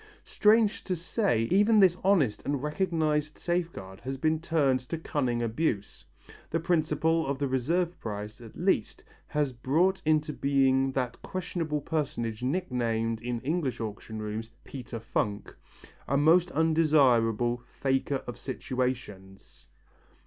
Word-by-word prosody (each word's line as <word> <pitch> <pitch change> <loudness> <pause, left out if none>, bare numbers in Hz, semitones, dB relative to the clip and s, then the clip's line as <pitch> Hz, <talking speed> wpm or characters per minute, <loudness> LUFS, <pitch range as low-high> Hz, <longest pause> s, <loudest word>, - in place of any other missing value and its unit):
Strange 215 0 +3
to 185 - -1
say, 165 - 0
even 210 +3 +5
this 185 -3 +6
honest 160 - +2
and 140 -1 -2
recognized 150 -2 0
safeguard 165 - -3
has 135 +2 -5
been 155 +3 +1
turned 150 -6 +2
to 130 +7 -5
cunning 130 -7 -1
abuse. 115 -3 -2 0.5
The 165 - 0
principle 160 -1 +1
of 140 0 -1
the 140 0 -1
reserve 165 +8 0
price, 105 0 -6
at 115 -2 -12
least, - - 0 0.2
has 145 -3 -1
brought 160 +11 +1
into 155 -1 +1
being 135 -1 +2
that 125 -2 -2
questionable 165 -5 -3
personage 125 -8 -2
nicknamed 120 -7 -1
in 120 -1 -3
English 140 -4 -1
auction 110 0 -6
rooms 110 +1 -4
Peter 120 -3 -7
Funk, 105 -2 -2 0.5
a 140 - +1
most 165 +4 +5
undesirable 130 -8 +3 0.2
"faker 135 0 0
of 120 - -7
situations." 125 -8 -5
140 Hz, 125 wpm, -28 LUFS, 120-165 Hz, 0.5 s, this